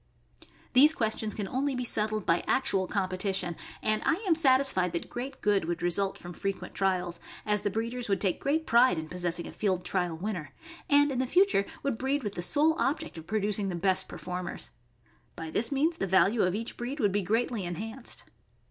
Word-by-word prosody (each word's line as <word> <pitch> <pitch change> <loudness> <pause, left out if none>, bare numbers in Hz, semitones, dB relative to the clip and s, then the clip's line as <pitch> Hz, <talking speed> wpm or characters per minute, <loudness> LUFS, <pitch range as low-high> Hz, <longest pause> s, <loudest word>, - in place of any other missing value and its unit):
These 295 +5 +7
questions 220 -2 -1
can 205 -2 -3
only 270 +5 -1
be 250 - -2
settled 215 -3 +1
by 165 - +2
actual 200 -9 +1
competi 190 0 -1
tion, 175 -2 -2 0.3
and 215 0 +1
I 325 - +3
am 345 - +5
satisfied 265 - +3
that 170 - -4
great 255 +3 -6
good 205 -4 +2
would 170 0 -3
result 190 +3 +1
from 175 0 -9
frequent 195 +3 -4
trials, 180 -3 0 0.3
as 210 -1 +1
the 205 - 0
breeders 230 +3 -3
would 195 -1 +2
take 190 -4 0
great 315 +3 0
pride 235 -4 +5
in 160 0 -4
possessing 175 -1 -1
a - - -7
field 185 -4 -1
trial 180 -4 -1
winner, 175 -7 -5 0.3
and 290 -1 +5
in 255 - -2
the 260 - 0
future 355 - +3 0.2
would 275 -5 -1
breed 270 +2 0
with 205 -2 -3
the 175 - -4
sole 305 - +3
object 310 - -1
of 160 - -13
producing 210 -1 0
the 180 - -3
best 185 +2 +1
performers. 180 -1 -6 0.6
By 160 -1 -6
this 225 - +1
means 310 +5 +1
the 195 - -1
value 190 +4 +4
of 180 0 +2
each 225 +2 -4
breed 255 +5 -4
would 205 -6 +2
be 205 +1 +1
greatly 225 +2 0
enhanced. 220 +8 -5
210 Hz, 200 wpm, -29 LUFS, 185-255 Hz, 0.6 s, These